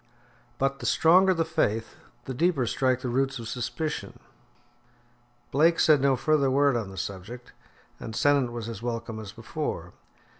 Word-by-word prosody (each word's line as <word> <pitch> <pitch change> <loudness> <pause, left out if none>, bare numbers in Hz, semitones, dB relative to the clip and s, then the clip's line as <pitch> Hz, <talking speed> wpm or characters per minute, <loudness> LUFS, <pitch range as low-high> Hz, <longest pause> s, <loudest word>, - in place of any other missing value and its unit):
But 135 0 0
the - - -4
stronger 185 +4 +5
the 165 -3 +1
faith, 115 -9 -1 0.3
the 130 - -4
deeper 155 -1 +1
strike 130 +2 0
the 130 - -3
roots 135 +2 0
of 115 -2 -7
suspicion. 130 +7 -4 1.3
Blake 165 +5 +3
said 150 -3 +5
no 135 -1 +3
further 140 +1 +2
word 140 0 +3
on 110 -4 -2
the 95 - -11
subject, 100 +7 -7 0.5
and 110 - -7
Sennett 140 -3 +2
was 120 -2 -5
as 115 -3 -7
welcome 115 -2 -4
as 105 -2 -8
before. 110 - -5
130 Hz, 155 wpm, -27 LUFS, 115-145 Hz, 1.3 s, stronger